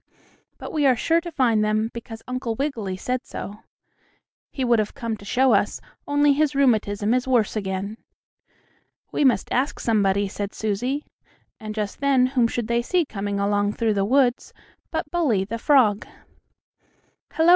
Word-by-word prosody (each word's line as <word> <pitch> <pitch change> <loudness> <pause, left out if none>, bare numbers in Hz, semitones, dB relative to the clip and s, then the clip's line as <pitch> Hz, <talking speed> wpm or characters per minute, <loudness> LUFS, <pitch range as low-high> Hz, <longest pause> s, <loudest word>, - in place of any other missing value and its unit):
"But - - -8
we 295 -3 +3
are 255 - +5
sure 330 +8 +2
to 345 0 -7
find 235 -7 +2
them, 215 +1 0
because 225 -1 -8
Uncle 255 -2 -3
Wiggily 225 -9 -3
said 255 +6 -2
so. 205 +2 -8 0.9
He 265 - -2
would 240 -2 +3
have 210 -1 -2
come 230 -5 -3
to 200 - -14
show 255 +4 +3
us, 205 0 +1 0.3
only 290 0 +4
his 295 0 +1
rheumatism 215 -5 +2
is 255 +1 0
worse 240 -6 +2
again." 200 +1 -3 1.1
"We - - 0
must 245 -8 +2
ask 260 +4 0
somebody," 200 -3 +1
said 200 +1 -5
Susie, 245 +7 -2 0.5
and 215 -1 -6
just 210 -2 -3
then 275 -2 +3
whom 245 -3 +3
should 235 -1 -3
they 235 0 +1
see 345 +7 +1
coming 200 -4 -3
along 205 +1 +1
through 225 -1 0
the 200 -1 +1
woods 250 +3 +1 0.4
but 320 - -2
Bully, 260 - +1
the 230 +3 -5
frog. 230 -7 +3 1.3
"Hello!" 325 +1 +3
230 Hz, 165 wpm, -23 LUFS, 205-270 Hz, 1.3 s, are